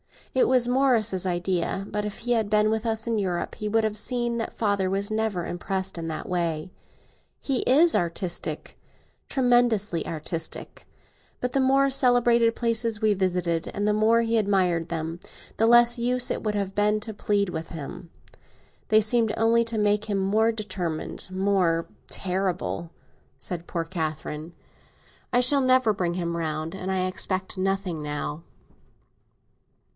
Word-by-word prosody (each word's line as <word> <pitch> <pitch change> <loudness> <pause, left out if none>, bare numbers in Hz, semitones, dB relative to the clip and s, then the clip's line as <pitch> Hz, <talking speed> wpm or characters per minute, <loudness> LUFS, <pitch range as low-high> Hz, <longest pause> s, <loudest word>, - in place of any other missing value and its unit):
It 260 - +3
was 250 -1 +3
Morris's 230 -8 +2
idea; 180 +2 -1
but 210 0 -2
if 210 - -5
he 245 - -3
had 220 -3 +1
been 210 0 +3
with 220 +1 -1
us, 225 0 -1
in 230 -1 0
Europe, 180 -3 -2
he 215 - -4
would 225 +1 +2
have 215 -1 0
seen 240 +1 0
that 225 - -3
father 200 -4 0
was 200 +2 -1
never 215 -5 -1
impressed 190 +2 -3
in 165 -1 -4
that 155 -1 -5
way. 170 -1 -2 0.7
He 270 -3 -1
is 315 +6 +5
artistic—tremendously 205 - -1
artistic; 165 +1 -5 0.5
but 250 - -2
the 275 - +2
more 270 +1 +3
celebrated 240 -3 +4
places 230 -2 0
we 215 -1 +3
visited, 180 -3 -1
and 205 +1 0
the 210 - +3
more 220 +2 +3
he 230 0 +1
admired 180 -5 +1
them, 165 0 -4 0.4
the 225 - +3
less 240 +1 +6
use 250 +1 +2
it - - -2
would 210 -1 -2
have 200 -1 -2
been 210 +1 +2
to 220 0 -5
plead 205 -1 0
with 165 -1 -5
him. 165 +1 -8 0.8
They 215 0 +5
seemed 220 0 +2
only 230 +1 +3
to 230 -1 -2
make 210 0 +2
him 205 -2 -1
more 210 +4 +2
determined—more 185 -2 -1 0.2
terrible," 185 -2 -2 0.5
said 175 -1 -5
poor 170 -2 -2
Catherine. 160 -1 -5 0.8
"I 245 0 +4
shall 275 +3 +4
never 255 -4 +4
bring 175 -3 -2
him 170 -2 -2
round, 155 0 -3
and 190 0 -4
I 185 -1 0
expect 185 +1 -1
nothing 190 -3 -1
now." 150 +1 -4
205 Hz, 150 wpm, -25 LUFS, 175-230 Hz, 0.8 s, less